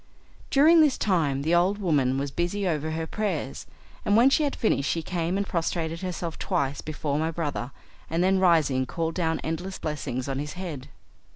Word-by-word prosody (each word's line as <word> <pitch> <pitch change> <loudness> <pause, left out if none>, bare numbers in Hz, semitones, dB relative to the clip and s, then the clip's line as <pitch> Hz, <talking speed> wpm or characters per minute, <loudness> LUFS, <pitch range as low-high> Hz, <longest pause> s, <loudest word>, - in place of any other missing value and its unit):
During 315 +4 +6
this 295 -4 +4
time 150 -9 +1
the 160 +3 +1
old 180 +4 +3
woman 145 -9 +1
was 140 0 -2
busy 175 +6 -1
over 155 -2 -1
her 160 +1 -2
prayers, 175 -8 -3 0.4
and 205 - +3
when 250 +4 +6
she 310 - +3
had 290 -2 0
finished 140 -11 +1
she 165 - -1
came 175 +1 -1
and 200 - 0
prostrated 165 -2 -2
herself 180 -3 -4
twice 140 0 -1
before 150 -1 -2
my 160 +1 0
brother, 150 -6 -3 0.4
and 165 +2 +1
then 190 +1 +3
rising 155 -8 +3
called 165 -1 -2
down 160 -2 0
endless 175 +4 -4
blessings 135 -4 -4
on 135 0 -2
his 150 +1 -4
head. 165 -8 -6
165 Hz, 185 wpm, -26 LUFS, 145-185 Hz, 0.4 s, During